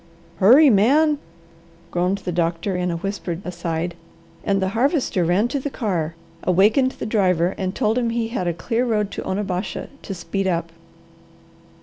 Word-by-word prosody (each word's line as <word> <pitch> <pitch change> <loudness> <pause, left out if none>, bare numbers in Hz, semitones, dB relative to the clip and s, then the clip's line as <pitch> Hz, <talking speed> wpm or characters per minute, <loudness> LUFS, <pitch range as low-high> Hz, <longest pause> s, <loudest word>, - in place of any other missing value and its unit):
"Hurry 255 - +7
man!" 285 +9 +4 0.7
groaned 180 +3 +1
the 180 - -1
doctor 170 +2 -1
in 180 0 -1
a 170 - -2
whispered 180 -2 -4
aside, 175 -1 -3 0.5
and 195 -1 +1
the 190 0 0
Harvester 245 - +1
ran 180 +7 +2
to 280 - -1
the 285 - -3
car, 175 - -2 0.3
awakened 215 +9 +3
the - - -6
driver 185 -5 +2
and 190 -1 -3
told 220 +3 +1
him 235 -2 0
he 230 -1 -1
had 190 -7 -2
a 170 - +1
clear 230 +6 -1
road 210 -4 0
to - - -5
Onabasha, 190 -1 -3
to 195 - -6
speed 180 +3 -2
up. 170 -2 -1
195 Hz, 160 wpm, -22 LUFS, 175-230 Hz, 0.7 s, Hurry